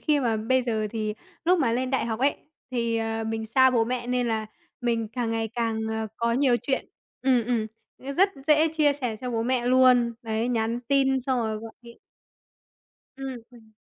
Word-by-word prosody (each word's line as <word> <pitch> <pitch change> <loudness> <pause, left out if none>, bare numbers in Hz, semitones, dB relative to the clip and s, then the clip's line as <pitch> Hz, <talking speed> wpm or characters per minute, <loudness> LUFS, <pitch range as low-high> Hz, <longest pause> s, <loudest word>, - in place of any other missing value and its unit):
khi 300 -2 +2
mà 230 -3 +1
bây 255 +4 +1
giờ 220 -3 -1
thì 215 -2 -2 0.3
lúc 360 +2 +4
mà 245 -7 +2
lên 255 +2 -1
đại 265 -3 0
học 225 +1 -3
ấy, 280 +2 +2 0.3
thì, 235 -2 0
ờ, 225 0 -2
mình 220 0 -3
xa 260 +3 +5
bố 230 -2 +2
mẹ 245 0 -3
nên 250 -1 0
là 220 -1 -1 0.3
mình 230 -2 0
càng 235 0 -2
ngày 225 0 -1
càng, 230 -2 -1
ờ, 220 0 -2
có 235 0 0
nhiều 255 -1 +3
chuyện. 265 - -1 0.4
Ừm, 255 -3 +3
ừm, 230 -2 0 0.5
rất 385 +3 +5 0.2
dễ 310 +1 +5
chia 305 -2 +2
sẻ 250 -6 -3
cho 250 -1 -4
bố 225 -1 -1
mẹ 245 0 0
luôn, 250 -2 +5
đấy, 225 +1 -1
nhắn 230 0 0
tin 270 -1 +3
xong 260 0 0
rồi 220 -1 -1
gọi 225 +1 -8
điện. 235 0 -14 1.2
Ừm, 265 -3 -6
ừm. 220 -2 -18
240 Hz, 200 wpm, -26 LUFS, 225-260 Hz, 1.2 s, xa